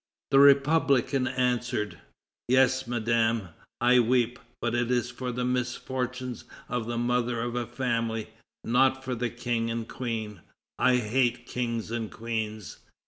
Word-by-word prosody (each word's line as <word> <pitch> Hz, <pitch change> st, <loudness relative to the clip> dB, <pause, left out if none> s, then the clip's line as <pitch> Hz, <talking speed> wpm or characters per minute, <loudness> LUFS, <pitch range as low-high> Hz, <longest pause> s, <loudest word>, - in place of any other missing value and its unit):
The 135 Hz, -, +6 dB
republican 140 Hz, -2 st, +4 dB
answered: 125 Hz, -4 st, -1 dB, 0.5 s
"Yes, 130 Hz, 0 st, +3 dB
Madame, 115 Hz, -3 st, +1 dB, 0.3 s
I 125 Hz, +1 st, +5 dB
weep, 120 Hz, 0 st, +2 dB, 0.2 s
but 120 Hz, -1 st, -1 dB
it 120 Hz, 0 st, 0 dB
is 120 Hz, -1 st, 0 dB
for 125 Hz, +1 st, -4 dB
the 125 Hz, +1 st, -2 dB
misfortunes 125 Hz, 0 st, -3 dB, 0.2 s
of 125 Hz, -2 st, -3 dB
the 120 Hz, 0 st, -2 dB
mother 120 Hz, 0 st, 0 dB
of 120 Hz, +1 st, -2 dB
a 120 Hz, -1 st, -2 dB
family, 115 Hz, -3 st, -2 dB, 0.3 s
not 130 Hz, +3 st, +3 dB
for 130 Hz, -1 st, -3 dB
the 120 Hz, 0 st, -1 dB
King 120 Hz, -1 st, -2 dB
and 115 Hz, 0 st, -3 dB
Queen; 110 Hz, -6 st, -4 dB, 0.4 s
I 130 Hz, -, +4 dB
hate 120 Hz, +1 st, +1 dB
kings 115 Hz, -3 st, -3 dB
and 115 Hz, -2 st, -3 dB
queens." 110 Hz, -3 st, -4 dB
120 Hz, 140 wpm, -27 LUFS, 115-125 Hz, 0.5 s, The